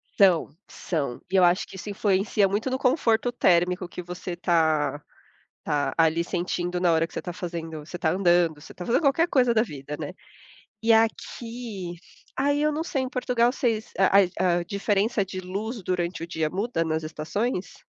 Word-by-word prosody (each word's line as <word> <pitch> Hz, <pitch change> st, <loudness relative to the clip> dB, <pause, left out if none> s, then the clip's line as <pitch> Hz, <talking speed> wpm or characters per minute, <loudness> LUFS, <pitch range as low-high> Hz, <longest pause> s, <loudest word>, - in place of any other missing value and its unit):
São, 185 Hz, -5 st, +4 dB, 0.2 s
são. 145 Hz, -8 st, -3 dB
E -, -, 0 dB
eu 185 Hz, -, +6 dB
acho 175 Hz, +1 st, +3 dB
que -, -, -12 dB
isso 190 Hz, +2 st, -7 dB
influencia 200 Hz, 0 st, +2 dB
muito 205 Hz, +6 st, -1 dB
no 260 Hz, -, -1 dB
conforto 245 Hz, -3 st, +2 dB
térmico 180 Hz, -4 st, +2 dB
que 180 Hz, -, -6 dB
você 180 Hz, 0 st, -6 dB
tá 160 Hz, -4 st, +1 dB, 0.6 s
tá 145 Hz, -1 st, 0 dB
ali 165 Hz, +1 st, +3 dB
sentindo 175 Hz, 0 st, -2 dB
na 175 Hz, -, +4 dB
hora 165 Hz, 0 st, +2 dB
que -, -, -20 dB
você -, -, -3 dB
tá 175 Hz, -, -5 dB
fazendo 165 Hz, -3 st, -5 dB
você 175 Hz, -, -7 dB
tá 170 Hz, -2 st, +1 dB
andando, 175 Hz, -3 st, +3 dB
você 150 Hz, -, -12 dB
tá 180 Hz, -, -8 dB
fazendo 235 Hz, -, +2 dB
qualquer 325 Hz, +4 st, +3 dB
coisa 250 Hz, -3 st, +3 dB
da 220 Hz, -, +4 dB
vida, 145 Hz, -, -7 dB
né. -, -, -5 dB, 0.7 s
E 230 Hz, -, +3 dB
aqui 225 Hz, -3 st, -1 dB, 0.4 s
aí 285 Hz, +2 st, +1 dB
eu 305 Hz, -, +3 dB
não 305 Hz, +2 st, -2 dB
sei 275 Hz, -5 st, -1 dB
em 260 Hz, -, -4 dB
Portugal, 250 Hz, -2 st, +1 dB
vocês 230 Hz, -4 st, -1 dB
a 195 Hz, +1 st, +6 dB, 0.2 s
a 180 Hz, -2 st, +3 dB
a -, -, -3 dB
diferença 200 Hz, +3 st, 0 dB
de 185 Hz, 0 st, -6 dB
luz 200 Hz, +4 st, -5 dB
durante 175 Hz, -1 st, -2 dB
o -, -, -5 dB
dia 160 Hz, -2 st, -1 dB
muda 195 Hz, 0 st, -1 dB
nas 160 Hz, -1 st, -2 dB
estações? 180 Hz, +7 st, -3 dB
185 Hz, 185 wpm, -25 LUFS, 170-225 Hz, 0.7 s, eu